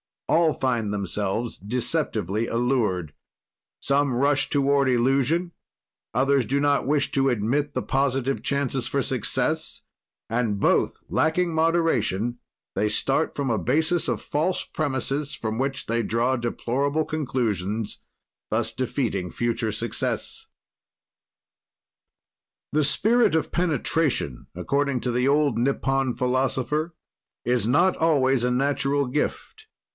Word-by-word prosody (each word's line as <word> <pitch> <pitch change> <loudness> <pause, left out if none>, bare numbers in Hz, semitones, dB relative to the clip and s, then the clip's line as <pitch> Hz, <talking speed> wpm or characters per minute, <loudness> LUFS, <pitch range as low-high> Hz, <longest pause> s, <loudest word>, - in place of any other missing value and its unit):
All 165 -1 +3
find 120 -6 -1
themselves 100 +3 -2
deceptively 110 -1 -1
allured; 115 - 0 0.7
some 140 -1 +2
rush 140 +2 +2
toward 140 -1 +2
illusion, 135 +7 +2 0.6
others 135 +1 +2
do 140 +6 0
not 145 -2 +2
wish 145 0 +1
to 135 0 +2
admit 130 +6 0
the - - -2
positive 135 0 0
chances 135 -3 -1
for 140 +1 0
success, 125 -5 -1 0.5
and 115 -3 0
both - - +1
lacking 170 +2 +1
moderation, 135 - +1 0.4
they 105 - +1
start 135 +8 0
from 140 -3 -1
a 110 - +1
basis 160 - +1
of - - -1
false 160 +5 -1
premises 140 0 -2
from 110 0 -3
which 135 +1 -2
they 115 0 0
draw 115 +4 +1
deplorable 135 +5 -1
conclusions, 115 - -2 0.5
thus - - 0
defeating 115 -8 -2
future 115 -2 -1
success. 115 +1 -3 2.2
The 150 -1 +2
spirit 225 - +3
of 160 - 0
penetration, 155 - 0
according 140 -3 0
to 125 - -1
the 125 +2 +1
old 145 -4 +2
Nippon 135 0 0
philosopher, 130 +5 0 0.5
is 120 -2 +1
not 175 +9 +3
always 135 -6 +2
a - - +2
natural 140 +2 +1
gift. 150 - -3
135 Hz, 115 wpm, -25 LUFS, 120-145 Hz, 2.2 s, All